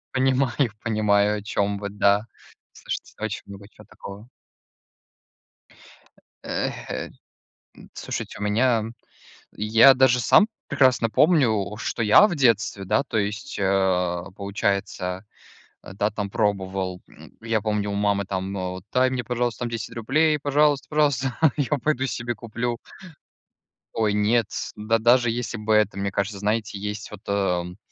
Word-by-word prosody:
понимаю, 130 -2 +1
понимаю, 105 -2 +2
о 105 - -8
чём 100 -1 -1
вы, 100 - -5
да. 100 +1 +2 0.5
Слушайте, - - -6
это - - -6
очень - - -4
много 100 0 -11
чё - - -17
такого. 100 +4 -11 2.2
Эх, - - -4
э, - - -4 0.8
слушайте, - - -6
у - - -4
меня 115 +3 +2
м 110 +2 -6 0.6
я 110 +5 +6
даже 125 -1 +4
сам 205 - +5 0.2
прекрасно 125 -4 +3
помню, 110 - +2
что 115 - -3
я 110 - +7
в 175 - -3
детстве, 105 -7 +1
да, 115 - +1
то 125 -5 -3
есть, 105 0 -3
а, 95 -2 +1
получается, 100 -2 -2 0.6
да, 100 +2 -2
там 105 -1 -4
пробовал. 95 -4 -1
М, - - -17
я 115 -1 -1
помню, 105 -1 -1
у - - -3
мамы 100 -1 0
там, 95 0 -4
э, 90 -1 -3
вот: 90 0 -8
"Дай 130 0 +3
мне, 125 -2 -2
пожалуйста, 120 -1 -2
там 120 - -2
10 115 -1 -5
рублей, 150 +7 +2
пожалуйста, 145 0 +2
пожалуйста, 140 -5 +1 0.2
я 145 +1 0
пойду 135 0 0
себе 120 -1 -3
куплю" 120 +1 -4 1.2
Ой, 110 -2 +1
нет. 105 +2 +2 0.3
Да 110 +2 +1
даже 120 +1 +4
если 120 0 -4
бы 110 0 -1
это 105 -2 +2
мне 100 0 -2
кажется, 100 +1 -2
знаете, 105 +1 -1
есть 105 +1 -5
вот, 105 -2 -10
эм, 90 -3 -1
105 Hz, 145 wpm, -24 LUFS, 100-120 Hz, 2.2 s, я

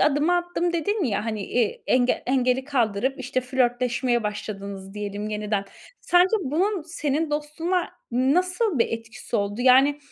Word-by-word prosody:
adımı 300 +4 +3
attım." 350 0 -1
dedin 380 +4 0
ya, 210 -4 -1
hani, 220 -2 -3
iii, 240 -3 0
engel 255 0 +2
engeli 255 0 +1
kaldırıp, 255 -2 0
işte, 255 0 -1
flörtleşmeye 250 -1 0
başladınız, 200 -2 -6
diyelim 205 0 -4
yeniden. 210 -1 -2 0.4
Sence 360 +4 +4
bunun 355 +7 0
senin 305 -1 -2
dostluğuna 325 +4 -1 0.2
nasıl 355 - +1
bir 230 - +4
etkisi 230 +1 -5
oldu? 205 +2 -2
Yani 265 +3 +5
255 Hz, 135 wpm, -24 LUFS, 225-315 Hz, 0.4 s, Yani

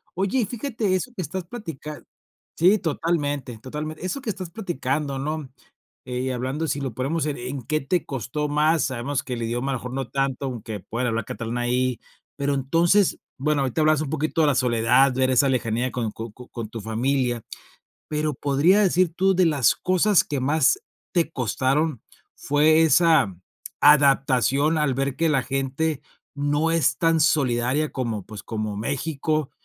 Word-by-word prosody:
Oye, 195 +8 0
y 235 - +2
fíjate 230 -3 -2
eso 245 +7 -3
que 185 - -3
estás 185 +1 -4
platicando 165 - -8 0.5
sí, 185 +6 +5
totalmente, 145 -7 -2
totalmente. 150 +7 -6
Eso 230 +9 -2
que 245 - -5
estás 185 -4 -4
platicando, 150 - -2
¿no?, 150 0 -3 0.6
eh, 125 0 -4
y 130 - -1
hablando 130 +6 -2
si 140 0 -2
lo 135 -4 -3
ponemos 140 +7 -1
en 145 - -2
¿en 125 +2 -5
qué 155 +5 0
te 170 +5 -1
costó 140 +3 -3
más? 155 +2 +2
Sabemos 130 +2 -2
que 130 - -5
el 120 - -4
idioma 120 +4 -2
a - - 0
lo - - -4
mejor 125 +2 -7
no 135 -2 -3
tanto, 135 -1 -1
aunque 110 -5 -6
pueda 120 +5 -3
hablar 115 0 -1
catalán 115 +1 -4
ahí. 125 0 0 0.4
Pero 140 0 0
entonces, 170 +8 +2 0.2
bueno, 145 +1 +1
ahorita 135 +2 -1
hablas 155 -1 +3
un 155 - -3
poquito 155 +2 0
de 155 - +4
la 145 - +2
soledad, 125 +2 +3
ver 130 0 +2
esa 130 +2 +4
lejanía 120 -1 0
con 115 -2 -2
co 115 +1 -7
con 125 +1 -13
con 115 -3 -6
tu 115 0 -7
familia, 120 +2 0 0.7
pero 150 -1 -1
podrías 145 +10 +3
decir 180 -3 +2
tú 190 +1 +3
de 185 0 +4
las 145 -6 +3
cosas 185 +2 +3
que 145 -2 -3
más 155 - +3 0.3
te 170 -3 +1
costaron, 135 +2 0 0.3
fue 155 +3 +3
esa 160 - +4 0.5
adaptación 140 +1 +4
al 150 -3 +1
ver 135 0 -1
que 165 -1 +1
la 140 -3 +2
gente 135 +3 -2 0.3
no 145 +3 +1
es 165 -2 +2
tan 165 -1 +2
solidaria 140 -2 +1
como, 115 -6 -3
pues, 105 -1 -9
como 110 -2 -4
México, 145 +4 -2
140 Hz, 175 wpm, -24 LUFS, 125-160 Hz, 0.7 s, sí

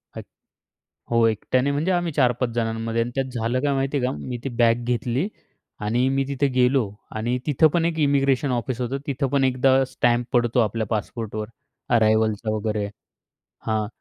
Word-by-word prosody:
अ‍ॅक - - -7 0.9
हो, 115 -1 +4
एकट्याने 125 +5 0
म्हणजे 150 +6 0
आम्ही 175 -2 0
4-5 125 -3 +2
जणांमध्ये 115 0 -1
आणि 120 +1 -2
त्यात 135 -1 0
झालं 115 +3 0
काय 145 0 +1
माहिती 135 +1 0
आहे 125 - 0
का, 130 - 0
मी 125 -2 -5
ती 135 - -2
बॅग 120 -1 +2
घेतली 125 +6 -1 0.6
आणि 120 +4 +1
मी 135 0 +1
तिथे 140 0 0
गेलो 125 +1 +4 0.3
आणि 120 +3 -1
तिथं 150 +2 +5
पण 170 -1 +2
एक 165 -1 -1
इमिग्रेशन 140 -2 +2
ऑफिस 125 0 -2
होतं. 125 +2 -2
तिथं 140 0 -1
पण 140 +1 +2
एकदा 130 +1 +3
स्टॅम्प 120 -2 +1
पडतो 120 0 +2
आपल्या 110 0 +1
पासपोर्टवर 110 0 -3 0.5
अरायव्हलचा 110 -1 +2
वगैरे 105 -1 -1 0.8
हां. 110 -1 0
125 Hz, 165 wpm, -23 LUFS, 115-135 Hz, 0.9 s, तिथं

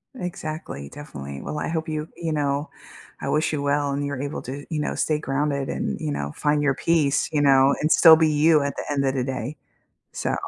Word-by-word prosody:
Exactly, 155 - -6
definitely. 70 - -8
Well, 150 - -5
I - - -2
hope 160 0 -2
you 155 0 -3
you 165 -2 -3
know, 145 0 -1 0.5
I - - -4
wish 155 +1 +1
you 145 -2 -2
well 145 0 +1
and 140 +1 -2
you're 140 -2 -3
able 145 +1 -4
to, 140 +3 -6
you 160 -3 -2
know, 150 - -1
stay 155 -1 0
grounded 140 -1 -1
and, - - -2
you 155 -1 -2
know, 70 - -3
find 150 0 +1
your 140 -2 +2
peace, 150 -4 +1
you 150 - +1
know, 135 -1 +5
and 155 - +1
still 160 -2 +9
be 160 -1 +3
you 155 +1 +4
at 140 -1 -2
the - - -5
end 140 -1 0
of 135 0 0
the 125 - 0
day. 130 +2 -4 0.6
So - - -2
145 Hz, 225 wpm, -24 LUFS, 140-155 Hz, 0.6 s, still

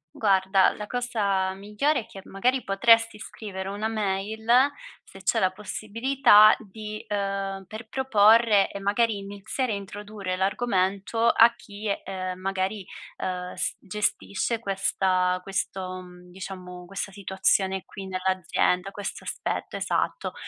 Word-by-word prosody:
Guarda, 190 -2 +3
la 210 0 -7
cosa 205 -6 0
migliore 210 +9 0
è 220 - -13
che, 195 - -11
magari, 250 +7 0
potresti 225 +2 +4
scrivere 195 -3 -7
una 205 +2 -2
mail, 215 +1 -3 0.5
se 195 - -14
c'è 185 - +1
la 185 - +2
possibilità, 215 +3 +4
di 215 +1 -8
uhm, 195 -1 -2
per 220 +3 -9
proporre 220 -4 +4
e 200 - -6
magari 205 +2 +1
iniziare 205 +5 -3
a - - -1
introdurre 200 -1 -5
l'argomento 195 +2 0
a 235 +1 +6
chi, 210 0 -9 0.2
uhm, 185 -1 -4
magari, 195 +2 -2 0.3
uhm, 180 -1 -4
s - - -2
gestisce 210 +2 -1
questa 190 -3 +1
questo, 190 -1 -3
mhmm, 180 0 -14
diciamo 180 -1 -8
questa 195 +2 -5
situazione 190 -1 0
qui 195 -2 -9
nell'azienda, 185 0 0
questo 205 0 -6
aspetto, - - -3
esatto. - - -1
195 Hz, 125 wpm, -26 LUFS, 190-215 Hz, 0.5 s, a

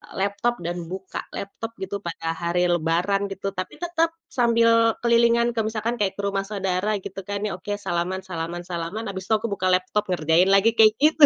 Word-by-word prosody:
laptop 200 +5 0
dan 175 +1 -2
buka 190 +1 -6 0.2
laptop 225 +3 -6
gitu 195 +1 -3
pada 165 -3 -5
hari 175 +1 +1
lebaran 175 +4 +1
gitu, 195 +1 -4
tapi 185 - -4
tetap 330 -1 +1 0.2
sambil 230 -1 +4
kelilingan 235 0 +4
ke - - 0
misalkan 225 +2 -2
kayak 195 -2 +1
ke 200 - -4
rumah 195 -1 -1
saudara 195 0 -1
gitu 195 +1 -7
kan, 200 0 -3
ya 210 - -1
oke 205 +3 -4
salaman 185 0 -2
salaman 170 -2 -5
salaman 175 +4 -4
habis 190 -1 -5
itu 220 - +1
aku 220 +2 -1
buka 200 -2 -2
laptop 185 +3 +1
ngerjain 165 +2 +3
lagi 195 +3 +5
kayak 215 -1 +7
gitu. 305 0 +7
195 Hz, 185 wpm, -24 LUFS, 180-225 Hz, 0.2 s, kayak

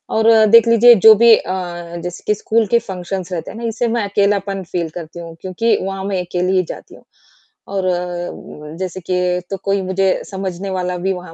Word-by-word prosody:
और 220 0 +2 0.2
देख 230 +2 +6
लीजिए 235 +1 +7
जो 220 - +11
भी 230 +1 +7
अ, 175 -3 -5
जैसे 180 0 -7
कि 210 - +2
स्कूल 220 +2 0
के 235 - +3
फंक्शन्स 185 -3 -6
रहते 165 -2 -5
हैं - - -10
ना - - -8
इससे 230 +2 -1
मैं 230 -1 -1
अकेलापन 200 -1 0
फ़ील 170 -2 -2
करती 170 0 -8
हूँ 165 -1 -9
क्योंकि 190 +5 0
वहाँ 195 0 -4
मैं 195 -2 -1
अकेली 180 +2 -1
ही 185 - +2
जाती - - -14
हूँ। - - -19 0.6
और 195 -2 -2 0.9
जैसे 185 0 -4
कि 180 0 0
तो 195 - -2
कोई 195 0 0
मुझे 190 +1 0 0.2
समझने 190 0 -5
वाला 180 -1 -2
भी 190 - +1
वहाँ 180 -2 -9
190 Hz, 195 wpm, -18 LUFS, 180-205 Hz, 0.9 s, जो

